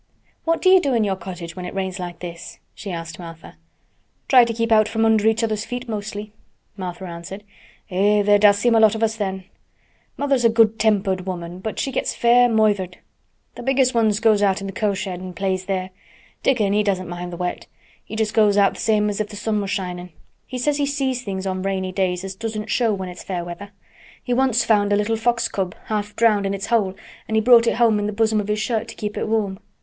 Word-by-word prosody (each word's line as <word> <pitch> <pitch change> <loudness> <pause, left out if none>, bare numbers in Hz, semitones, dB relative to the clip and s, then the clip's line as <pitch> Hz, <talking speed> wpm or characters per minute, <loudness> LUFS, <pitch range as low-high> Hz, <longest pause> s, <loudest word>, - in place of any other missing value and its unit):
"What 330 0 0
do 370 - +5
you 375 -1 +7
do 275 -5 0
in 225 - +2
your 195 -2 0
cottage 175 -2 -8
when 180 - -6
it 180 - -7
rains 190 0 -3
like 175 -1 -7
this?" 170 -1 -8 0.2
she 200 -1 -7
asked 165 0 -6
Martha. 165 -2 -10 0.7
"Try 250 -3 +7
to 235 - -2
keep 230 0 -2 0.2
from 225 0 0
under 220 -1 +3
each 225 +1 +2
other's 215 -2 -1
feet 245 +1 -6
mostly," 210 -1 -5 0.4
Martha 185 -1 -6
answered. 175 +3 -8 0.5
"Eh! 205 +3 +3
there 205 0 +4
does 205 -1 +6
seem 235 +3 +2
a 225 - +5
lot 220 -1 +5
of 220 - -2
us 220 0 +1
then. 190 -3 -3 0.7
Mother's 275 -3 +1
a 230 - +6
good 225 -1 +3
tempered 195 -4 +1
woman 175 -1 -5
but 215 +3 -5
she 270 - -2
gets 260 - -2
fair 245 +1 +5
moithered. 205 -5 +1 0.6
The - - -9
biggest 265 0 +2
ones 220 -3 +2
goes 215 -2 +3
out 195 -2 +2
in 195 - -6
th' 195 - -6
cow 205 -1 0
shed 185 -2 -4
and 185 -1 -8
plays 190 0 -2
there. 185 -1 -3 0.5
Dickon 215 -7 +2
he 210 - +3
doesn't 190 -3 -1
mind 175 0 -6
th' 175 - -7
wet. 180 0 -4 0.4
He - - -8
goes 215 -2 +2
out 200 -1 +4
just - - -7
th' - - -3
same 210 -1 +3
as 205 0 -1
if 210 - -2
th' 210 - -9
sun 210 0 -1
was 200 - -4
shinin'. 180 -2 -4 0.4
He 255 - -5
says 285 +4 0
he 285 -1 0
sees 270 -3 -1
things 195 -4 -5
on 185 -1 -2
rainy 190 -1 -2
days 185 -1 -1
as 195 0 -5
doesn't 215 +1 -5
show 235 -3 +2
when 190 -2 -3
it's 180 0 -9
fair 180 -3 -4
weather. 175 +4 -8 0.5
He 245 - -1
once 255 -2 +2
found 205 -2 +2
a - - +4
little 210 +2 0
fox 235 +1 +1
cub 185 -2 -3
half 210 -1 -3
drowned 210 -4 +3
in 195 - -1
its 195 - -4
hole 195 -5 +2 0.3
and 220 - 0
he - - +4
brought 235 0 +6
it - - +2
home 225 -2 +3
in 205 - -1
th' - - -10
bosom 220 -1 +2
of 205 - -7
his 210 0 0
shirt 220 0 -1
to - - -9
keep 210 -1 -5
it - - -2
warm. 205 -3 -1
210 Hz, 235 wpm, -21 LUFS, 190-225 Hz, 0.7 s, you